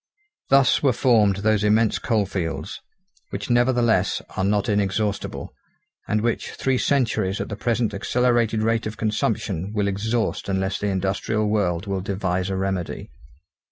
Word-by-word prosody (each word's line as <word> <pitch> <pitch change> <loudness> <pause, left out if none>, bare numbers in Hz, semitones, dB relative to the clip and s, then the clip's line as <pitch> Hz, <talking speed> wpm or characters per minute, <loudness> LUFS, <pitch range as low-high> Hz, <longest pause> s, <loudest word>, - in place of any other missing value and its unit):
Thus 135 0 +4
were 135 -3 +3
formed 110 -6 +3
those 110 -1 +3
immense 110 +1 +3
coalfields, 100 -7 -2 0.5
which 100 +4 -4
nevertheless, 120 -5 +2 0.2
are 95 - -1
not 100 +1 +1
inexhaustible, 100 0 -1 0.5
and 110 0 +1
which 115 +1 -2
three 130 -1 0
centuries 115 -8 +1
at - - -4
the 100 - -4
present 115 0 0
accelerated 120 +1 +1
rate 115 0 +1
of 110 0 -7
consumption 105 -4 -1
will 105 -1 +1
exhaust 110 +2 -1
unless 95 0 -1
the 105 - -1
industrial 100 +3 -1
world 95 -4 0
will 100 -2 -2
devise 95 -1 -2
a 95 - -1
remedy. 95 -2 -3
105 Hz, 140 wpm, -23 LUFS, 95-115 Hz, 0.5 s, Thus